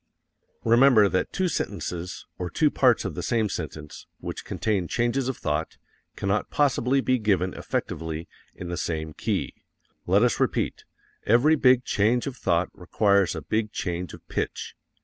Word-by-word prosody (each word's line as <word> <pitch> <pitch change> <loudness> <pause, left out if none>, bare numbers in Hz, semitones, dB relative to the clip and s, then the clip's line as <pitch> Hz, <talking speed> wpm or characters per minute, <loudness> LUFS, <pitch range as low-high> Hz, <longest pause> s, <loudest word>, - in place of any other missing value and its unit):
Remember 115 -2 +6
that 95 - -1
two 190 -1 0
sentences, 90 - -4
or 90 -1 -3
two 150 - +2
parts 125 -3 +3
of - - -3
the - - -4
same 115 -3 0
sentence, 80 -3 -7
which - - -6
contain 100 -6 -1
changes 120 +5 0
of 130 - -3
thought, 75 +1 -2 0.4
cannot 100 +2 -1
possibly 135 -2 +2
be 130 -1 +1
given 95 -4 +1
effectively 80 +1 -4 0.3
in 90 - -7
the 85 - -3
same 80 -2 -3
key. - - -2 0.5
Let 100 +5 +4
us 125 - +2
repeat, - - -1 0.4
every 125 +8 +5
big 125 -3 +4
change 115 +4 +2
of 140 -3 -4
thought 85 -6 +1
requires 100 0 +2
a 80 - -5
big 110 +7 -1
change 90 -4 -4
of - - -19
pitch. - - -4
105 Hz, 155 wpm, -25 LUFS, 90-125 Hz, 0.5 s, Remember